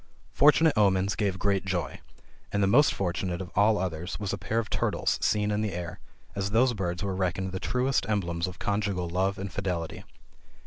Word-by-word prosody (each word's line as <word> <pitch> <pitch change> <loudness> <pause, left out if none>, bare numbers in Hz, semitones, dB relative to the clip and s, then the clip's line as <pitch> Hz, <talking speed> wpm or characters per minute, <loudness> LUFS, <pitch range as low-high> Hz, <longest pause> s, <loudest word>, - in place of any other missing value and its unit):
Fortunate 155 +2 +5
omens 100 -2 +3
gave 100 -4 -1
great 100 0 +1
joy, 95 -3 -3 0.5
and 100 0 +1
the - - +5
most 130 +10 +5
fortunate 90 -1 -2
of 95 -2 -7
all 105 +2 +4
others 90 -1 -3
was 100 -3 -3
a - - -2
pair 115 - -2
of 115 -1 0
turtles - - 0
seen 105 0 +1
in 105 0 0
the 105 -2 -2
air, 85 -1 -5 0.3
as 100 0 -2
those 120 +4 +3
birds 90 -3 -3
were 100 -1 -1
reckoned 95 0 -1
the 95 - -4
truest 125 +1 0
emblems 85 -4 -1
of 90 - -8
conjugal 100 -3 -1
love 95 +3 0
and 95 0 -5
fidelity. 90 -5 -3
95 Hz, 190 wpm, -28 LUFS, 90-105 Hz, 0.5 s, Fortunate